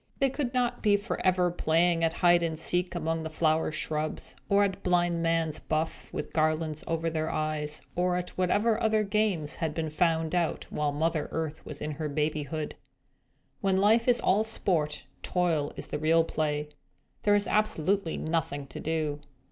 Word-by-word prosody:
They 275 -2 +2
could 270 -3 -2
not 250 -2 0
be 205 -2 +4
forever 185 -3 +1
playing 165 0 +2
at 165 - +3
hide 175 0 +4
and 165 -2 -1
seek 180 +3 -1
among 165 -1 -1
the 160 - -4
flower 155 0 +1
shrubs, 155 0 -2
or 200 0 +5
at 195 -1 -1
blind 175 -2 +2
man's 165 -2 +1
buff 160 +1 -3
with - - -5
garlands 155 -1 0
over 165 0 -1
their 160 -1 -1
eyes, 155 -1 -2
or 180 0 +1
at 180 0 -3
whatever 210 +5 +1
other 220 -1 +3
games 200 -7 0
had 160 -2 -2
been 160 -2 -2
found 160 0 +1
out, 175 -2 0
while 150 -1 0
Mother 155 +1 -1
Earth 160 -1 -3
was 150 -1 -6
in 150 - -2
her 150 0 -4
babyhood. 150 0 -2 0.9
When 195 -3 +1
life 220 +4 +4
is 245 -1 +4
all 210 +3 +3
sport, 165 -9 -1 0.2
toil 165 -5 0
is - - -7
the 150 - -3
real 165 +2 +4
play. 150 -2 -2 0.5
There 205 0 +4
was 205 0 +2
absolutely 200 -4 +1
nothing 155 -3 -2
to - - -7
do. 155 -2 -1
165 Hz, 170 wpm, -28 LUFS, 155-185 Hz, 0.9 s, or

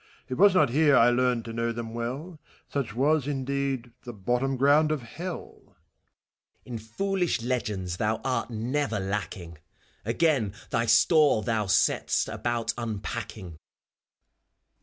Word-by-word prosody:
189 130 - -2
It - - -2
was 200 -2 +7
not 145 -9 +4
here 145 -2 +5
I 120 +1 +6
learned 125 -1 +1
to 115 - -6
know 115 0 -1
them 115 -1 -6
well; 135 +9 -5 0.3
Such 130 -7 -3
was, 145 +2 +2
indeed, 135 -3 -2
the 120 -4 -9
hottom 130 +3 +1
gronnd 145 +4 +4
of 155 -5 -2
Hell. 170 +10 -7
FAUST. - - -30 0.9
In 120 -2 -5
foolish 175 - -1
legends 105 -8 -2
thou 110 +2 0
art 125 -3 -1
never 120 +1 -1
lacking; 95 -4 -4 0.4
Again 115 -3 +1 0.2
thy 115 0 +1
store 140 +1 +4
thou 105 -1 0
set'st - - +2
about 120 -1 -1
unpacking. 105 -6 -5
120 Hz, 140 wpm, -27 LUFS, 110-140 Hz, 0.9 s, was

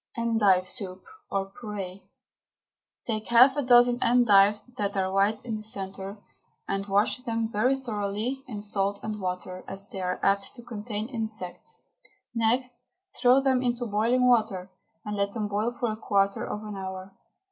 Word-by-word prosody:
ENDIVE 210 -6 +3
SOUP, 190 -5 -3 0.3
OR 195 0 -2
PUREE. 200 -4 -6 1.0
Take 215 -2 -3
half 250 +3 +7
a 290 - +1
dozen 245 -1 +5
endives 210 -4 +5
that 200 -3 -2
are 190 0 0
white 200 +4 +1
in 225 -3 -3
the - - -7
centre, 195 -1 -3 0.5
and 195 0 -2
wash 200 +2 +2
them 230 -3 -2
very 255 +6 +2
thoroughly 220 +2 -3
in 215 -5 -6
salt 200 -1 0
and 215 -1 -4
water, 185 0 -4
as 195 +1 -7
they 190 - -4
are 180 0 -2
apt 195 +3 +1
to 240 - -11
contain 215 -2 -5
insects. 225 - -4 0.5
Next 240 +2 0 0.4
throw. 255 +2 +6
them 265 -2 +2
into 245 -1 -1
boiling 235 +4 +2
water, 195 -6 +2 0.3
and 210 0 -3
let 200 0 0
them 215 -3 -2
boil 210 +3 0
for 240 -2 -2
a - - -3
quarter 200 -2 +1
of 210 - -5
an 210 -1 -6
hour. 190 0 -6
210 Hz, 160 wpm, -27 LUFS, 195-240 Hz, 1.0 s, half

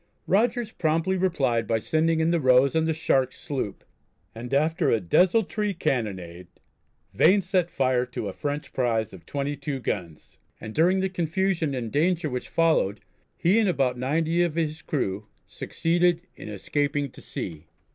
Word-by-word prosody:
Rogers 225 +3 +1
promptly 165 +2 0
replied 140 -11 +1
by 115 - +2
sending 160 +7 +1
in 160 +1 +2
the 170 - +2
Rose 130 0 +4
and 160 0 +1
the - - +2
Shark 135 -4 +1
sloop, 130 -9 -5 0.5
and 120 +2 -8
after 155 +4 +2
a 115 - +3
desultory 195 - +2
cannonade 95 - -3 0.7
Vane 200 +1 +4
set 180 -1 +1
fire 130 -4 +1
to 120 -4 -5
a 95 - -5
French 145 +5 -4
prize 115 -5 0
of 95 - -13
22 140 0 -3
guns 85 -10 -5 0.2
and 110 - -8
during 180 +6 +3
the 190 - +1
confusion 175 -3 -1
and 115 -4 -4
danger 160 0 +1
which 125 0 -4
followed 160 -12 +2 0.4
he 190 +7 +3
and 215 -4 +3
about 135 -7 +1
90 160 +7 0
of 170 -3 0
his 155 -1 -2
crew 105 -10 -2 0.2
succeeded 175 +1 0
in - - -10
escaping 145 +6 -1
to - - -14
sea. 80 0 -7
150 Hz, 155 wpm, -25 LUFS, 125-175 Hz, 0.7 s, Rose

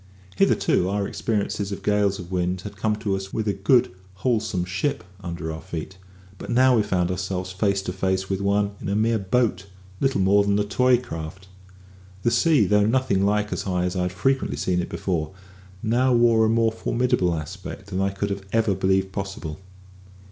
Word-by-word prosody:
Hitherto, 90 -1 +2
our 100 0 -1
experiences 105 -2 -2
of 100 - -6
gales 105 -1 +2
of 90 0 -9
wind 90 0 -1
had 105 +1 -8
come 105 +2 0
to 100 -2 -1
us 95 0 -6
with 110 -1 -2
a 100 - +2
good, 120 +5 +3 0.2
wholesome 110 -4 0
ship 90 +5 -2 0.2
under 85 -3 -5
our 80 - -7
feet; 85 +3 -7 0.4
but - - -8
now 130 +1 +5
we 110 - +4
found 90 -3 0
ourselves 90 0 -3
face 100 0 0
to 90 - -4
face 95 0 -1
with 95 0 -2
one 100 +1 +1
in - - -4
a 100 - 0
mere 110 +1 +2
boat, 100 -1 0 0.3
little 135 -6 +1
more 100 +2 +4
than 100 0 +1
a 105 - +2
toy 125 +4 +3
craft. 95 -4 -8 0.7
The 120 - +2
sea, 155 - +4
though 105 +1 +3
nothing 115 -5 +2
like 105 +1 +1
as - - -2
high 90 -2 -1
as 90 +1 -2
I 90 - 0
had 90 0 -1
frequently 135 +9 0
seen 90 -1 0
it - - -5
before, 85 -1 -2 0.5
now 125 +3 +2
wore 115 -2 +4
a - - +2
more 115 0 +3
formidable 110 -6 0
aspect 90 +4 -7
than 95 +1 -1
I 95 - +2
could 100 +1 -3 0.2
ever 115 -2 +2
have 95 - -2
believed 95 0 +1
possible. 95 -5 -5
100 Hz, 195 wpm, -24 LUFS, 95-110 Hz, 0.7 s, now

